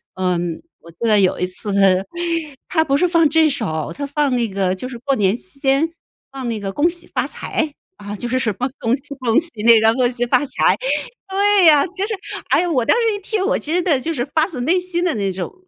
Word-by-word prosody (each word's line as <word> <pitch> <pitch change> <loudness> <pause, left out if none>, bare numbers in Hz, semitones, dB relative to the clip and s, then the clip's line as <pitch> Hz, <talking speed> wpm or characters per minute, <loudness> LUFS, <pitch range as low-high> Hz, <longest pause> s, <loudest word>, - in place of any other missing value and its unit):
嗯， 175 -3 -2 0.2
我 170 - -14
记 165 - -30
得 215 -3 +4
有 185 - +1
一 180 - +1
次 200 +3 -3
它 195 -1 +3 0.6
它 320 -3 +2
不 280 -2 +1
是 360 - +2
放 335 -3 +3
这 320 +1 +4
首， 160 - -3
它 285 - -5
放 290 0 0
那 235 -3 0
个 190 -1 -1
就 250 +7 -7
是 245 - -8
过 275 +2 0
年 200 0 +1
期 185 +4 -6
间 275 +4 +2 0.4
放 265 -3 -5
那 220 -2 -3
个 195 -1 -4
《恭 310 +4 +3
喜 350 0 -6
发 255 -2 0
财》， 300 +2 -2 0.4
啊， 205 - -5
就 240 - -5
是 255 +2 0
什 220 -4 -1
么 255 +2 -1
恭 230 - 0
喜 280 +1 -3
恭 235 +2 +3
喜 335 +1 +4
那 230 -1 +7
个， 220 +1 +4
恭 250 0 +1
喜 245 0 -1
发 250 +1 +3
财， 275 -1 +1 0.5
对 400 0 +3
呀， 300 -3 +6
就 380 +2 -3
是， 450 - -2 0.4
哎， 355 - +3
我 270 -8 +1
当 - - +3
时 460 -2 +1
一 410 - -5
听 395 -1 -2
我 - - +1
其 305 - -5
实 360 - +3
的 315 -7 +1
就 330 - -2
是 245 -5 -2
发 315 +2 +1
自 300 -10 -6
内 330 +9 +2
心 360 -1 -2
地 360 - +1
那 200 -3 -1
种 185 -1 -5
260 Hz, 265 characters per minute, -19 LUFS, 215-325 Hz, 0.6 s, 那